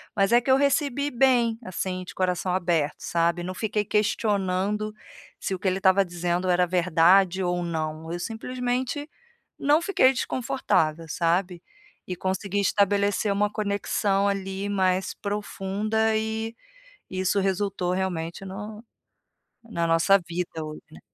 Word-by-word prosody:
mas 195 0 +2
é 240 - +7
que 245 - -5
eu 260 - +7
recebi 280 0 +1
bem, 240 -3 +3
assim 185 0 -3
de - - -10
coração 180 0 0
aberto, 170 -5 +1
sabe? 170 +1 0
Não 185 +1 -4
fiquei 210 +2 -1
questionando, 210 0 0 0.4
se - - -3
o 185 - -3
que 195 - -2
ele 185 +1 +1
estava 195 +1 +4
dizendo 175 +1 -2
era 180 0 +4
verdade 180 +2 +3
ou 175 0 0
não, 160 -1 -3
eu 175 - -3
simplesmente 250 - -3 0.5
não 295 +3 +3
fiquei 335 -8 +4
desconfortável, 165 -11 0
sabe? 175 +2 0 0.5
E 180 - -3
consegui 190 +2 -2
estabelecer 200 +1 +2
uma 205 +1 +1
conexão 200 -1 0
ali 195 0 -3
mais 190 -1 +1
profunda, 210 +2 -1
e, 220 +1 -3 0.6
isso 185 +2 0
resultou 190 -1 -1
realmente 180 -1 -3
no 210 +3 -8 0.9
na 170 -6 -1
nossa 165 +4 +5
vida 170 -2 -4
hoje, 155 0 -8
né. - - -13
195 Hz, 135 wpm, -25 LUFS, 180-215 Hz, 0.9 s, é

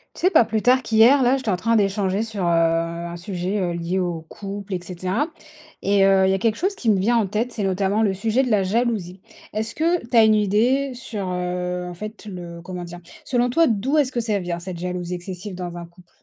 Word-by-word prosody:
Tu - - -10
sais 370 - +5
pas 240 - +5
plus 220 -1 -1
tard 255 +2 +4
qu'hier 235 +5 +5
là, 250 +2 +3
j'étais 260 -5 -4
en 185 - +2
train 230 +5 +1
d'échanger 200 -1 +1
sur 220 -4 -4
heu, - - +1
un 170 0 0
sujet, 185 +2 -3
heu, 180 -2 0
lié 170 +2 -2
au 175 -3 -1
couple 200 -1 -6
et - - -2
cetera 185 - -2 0.5
et 200 0 +3
heu, 195 -1 +4
il - - +3
y - - +3
a - - 0
quelque 220 +2 +1
chose 385 +3 -1
qui 235 - +1
me 200 - +2
vient 230 +5 +2
en 220 - +2
tête, 220 +5 -2
c'est 215 - -4
notamment 195 +3 +1
le 200 -3 +2
sujet 220 +6 +1
de 250 - -2
la 210 -2 +4
jalousie. 195 -3 -1 0.3
Est-ce 220 +2 -3
que 335 -2 0
tu 245 - -3
as 225 - +8
une 220 0 +5
idée 230 +7 +2
sur 220 -5 -5
heu, 180 0 -3
en - - -7
fait, 215 +4 -8
le 175 -3 -8
comment 180 0 -6
dire? 175 0 -9 0.3
Selon 245 -1 +1
toi, 330 +7 +4
d'où 245 +6 +1
est-ce 280 -3 +2
que 240 - 0
ça 220 -3 0
vient 175 -2 -4
cette 180 0 -7
jalousie 180 0 -4
excessive 185 +2 -7
dans 175 -1 -6
un 170 - -7
couple? 175 +1 -20
195 Hz, 245 wpm, -22 LUFS, 180-230 Hz, 0.5 s, as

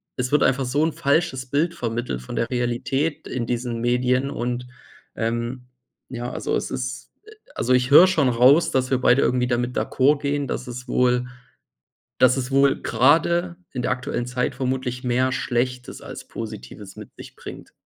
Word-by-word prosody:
es 125 +1 -2
wird 150 - +3
einfach 135 +1 +2
so 130 +4 0
'n 165 - -1
falsches 145 -3 0
Bild 155 +6 0
vermittelt 115 - -3
von - - -7
der - - 0
Realität 125 +5 -2
in 120 -2 -3
diesen 120 -1 -3
Medien 125 +2 +1
und, 125 -1 -3 0.5
ähm, 120 +2 -3 0.4
ja, 120 -1 -5
also, - - -2
es - - -3
ist 130 0 -5
äh, 435 - -15 0.2
also, 125 - 0
ich 125 +1 +2
höre 175 +6 +9
schon 155 -8 +2
raus, 140 +8 +5
dass 130 0 0
wir 130 - +2
beide 125 +1 +4
irgendwie 125 0 +1
damit 120 0 -1
d'accord 140 +2 +2
gehen, 145 0 -1
dass 125 - -4
es 125 +1 -7
wohl 125 0 +2 0.9
dass 130 +1 +4
es 130 0 -3
wohl 135 0 +3
gerade 170 +5 +2 0.2
in 125 - -3
der - - 0
aktuellen 125 -1 -3
Zeit 125 0 -2
vermutlich 130 -1 -3
mehr 125 +1 +1
Schlechtes 125 0 -2
als - - -9
Positives 105 -2 -8
mit - - -11
sich - - -12
bringt. - - -10
125 Hz, 175 wpm, -23 LUFS, 125-140 Hz, 0.9 s, höre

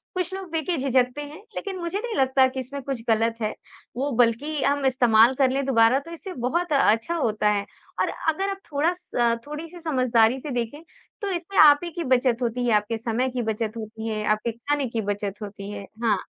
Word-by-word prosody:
कुछ 365 0 -2
लोग 380 -3 -6
देखिए 325 +1 -1
झिझकते 260 0 +1
हैं 295 +1 -8 0.2
लेकिन 390 -2 -4
मुझे 350 +3 -3
नहीं 470 0 -4
लगता 265 0 +4
कि 260 0 -5
इसमें 275 +2 -5
कुछ 265 -3 -4
गलत 225 +1 +2
है। 215 - +1 0.5
वो 280 +3 -1
बल्कि 255 +6 +2
हम 285 0 +1
इस्तेमाल 245 -2 +5
कर 265 -1 +3
लें 275 +1 0
दुबारा 240 0 +4
तो 315 +4 -12
इससे 365 +3 -7
बहुत 315 +7 -1
अच्छा 270 +4 +3
होता 215 -9 +1
है 205 -1 0 0.4
और - - +1 0.2
अगर 385 +5 0
आप 390 0 -4
थोड़ा 295 +4 +2
स 355 0 -22
अ, 235 -1 +3
थोड़ी-सी 320 +4 -7
समझदारी 255 -6 +2
से 295 - -7
देखें 245 +4 -3 0.4
तो 405 - -2
इससे 360 +2 -4
आप 290 0 +7
ही 345 - -3
की 345 0 -4
बचत 255 -2 +2
होती 245 +1 -1
है, 235 - +2
आपके 210 +2 0
समय 235 +3 -1
की 250 -1 -3
बचत 220 -1 -2
होती 220 0 -6
है, 215 -1 -2
आपके 215 +2 +1
खाने 280 +5 -1
की 230 -1 -2
बचत 205 0 -4
होती 200 -1 -7
है। 205 - -6 0.2
हाँ। 210 -5 +1
255 Hz, 210 wpm, -24 LUFS, 225-305 Hz, 0.5 s, आप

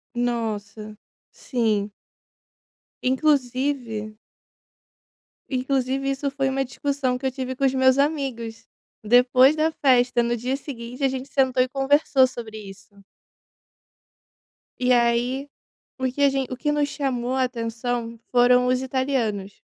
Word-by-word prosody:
Nossa, 215 -3 -3 0.3
sim. 215 -5 -1 1.1
Inclusive 255 -5 0 1.3
inclusive 265 0 -1
isso 275 +1 -2
foi 270 -1 -1
uma 270 0 0
discussão 275 -1 -2
que 265 - -8
eu 265 - +1
tive 260 0 -5
com 275 - 0
os 265 - +2
meus 260 0 +4
amigos 260 -6 -2 0.4
depois 250 +5 +5
da 315 +1 +1
festa. 250 -5 +3
No 235 0 0
dia 255 +4 -2
seguinte 250 -2 -8
a - - +5
gente 260 +1 -5
sentou 260 -2 +2
e 255 - -5
conversou 270 0 +3
sobre 225 -3 -8
isso. 200 -1 -13 1.8
E 250 - +3
aí, 245 +3 +1 0.5
o 260 - -1
que 285 - -5
a 280 - +6
gen 270 -1 -1
o 255 - -5
que 295 +3 -1
nos 295 -1 0
chamou 260 -3 -2
a 260 - +2
atenção 235 -1 -3
foram 250 0 +5
os 255 0 +1
italianos. 255 -7 -1
255 Hz, 130 wpm, -23 LUFS, 235-270 Hz, 1.8 s, a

